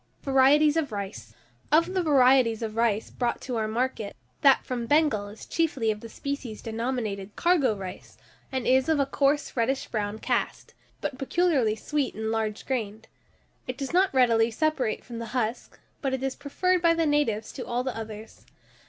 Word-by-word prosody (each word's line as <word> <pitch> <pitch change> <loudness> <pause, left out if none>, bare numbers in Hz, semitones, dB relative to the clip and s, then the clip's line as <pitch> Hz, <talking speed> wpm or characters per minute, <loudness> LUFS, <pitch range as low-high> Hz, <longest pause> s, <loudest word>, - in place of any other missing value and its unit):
VARIETIES 290 +3 +4
OF 295 -6 0
RICE. 155 - -6 0.4
Of 335 +4 +4
the 375 - +1
varieties 255 -7 +4
of 220 -1 -4
rice 225 -2 +1
brought 240 -2 -1
to 250 - -4
our 220 -1 0
market, 225 -2 -2 0.3
that 275 -2 +5
from 240 -2 -3
Bengal 290 -9 +2
is 205 +2 -11
chiefly 275 -9 0
of 210 - -5
the 230 - -10
species 270 -4 -5
denominated 225 -4 -3
cargo 335 -10 +3
rice, 190 -2 -9 0.3
and 260 -2 -2
is 260 +3 +3
of 315 -2 +3
a 280 - +3
coarse 280 +1 0
reddish 260 +3 0
brown 210 -1 -2
cast, - - -2 0.3
but 270 -3 -4
peculiarly 270 -7 +2
sweet 285 +4 -2
and 220 0 -2
large 220 -1 -2
grained; 220 -4 -3 0.6
it 255 - -4
does 275 +1 -4
not 375 +2 +4
readily 235 -3 +4
separate 265 -2 -1
from 235 -2 -7
the 230 - -5
husk, 230 0 -3 0.2
but 270 -2 0
it 265 - -6
is 270 -1 -1
preferred 360 +6 0
by 335 -1 +4
the 330 -1 +1
natives 265 -8 +1
to 255 - -6
all 245 +1 -2
the 260 -2 -3
others. 220 -1 -9
255 Hz, 180 wpm, -27 LUFS, 220-285 Hz, 0.6 s, that